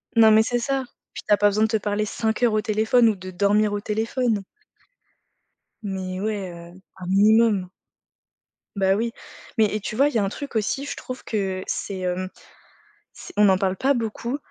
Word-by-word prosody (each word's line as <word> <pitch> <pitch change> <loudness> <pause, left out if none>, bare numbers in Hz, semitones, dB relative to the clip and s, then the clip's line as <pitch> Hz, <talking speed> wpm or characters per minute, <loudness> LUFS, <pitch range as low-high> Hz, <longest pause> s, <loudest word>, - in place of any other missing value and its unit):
Non 225 -1 +7
mais 220 0 +6
c'est 240 +2 -1
ça, 270 +2 -1 0.3
puis - - -8
tu 210 - +4
as 205 - +5
pas 205 - +4
besoin 210 +2 +1
de - - +4
te 220 0 +1
parler 210 +1 -1
5 220 +1 -2
heures 230 -3 +4
au 215 - +2
téléphone 220 +2 +3
ou 215 - 0
de 185 -1 -9
dormir 205 +3 +2
au 205 - -1
téléphone. 220 +1 -1 1.4
Mais 190 -2 -4
ouais, 205 -2 -3 0.3
heu, - - -15 0.2
un 185 - -8
minimum. 205 0 +4 1.1
Bah, 195 -1 +2
oui, 230 +2 -1 0.5
mais 220 - +5
et 215 - -1
tu 215 +1 -5
vois, 275 +4 +4
il 295 - -9
y - - +4
a - - +1
un 195 - 0
truc 280 +4 -8
aussi, 225 +6 -1
je 285 - -5
trouve 255 -1 -8
que 190 -3 -2
c'est, 195 -2 -3
hem, 185 0 -2 0.8
c - - -11
on 210 - +6
n'en 190 -1 +5
parle 190 0 0
pas 275 +6 +2
beaucoup. 235 +2 -3
215 Hz, 205 wpm, -23 LUFS, 195-230 Hz, 1.4 s, Non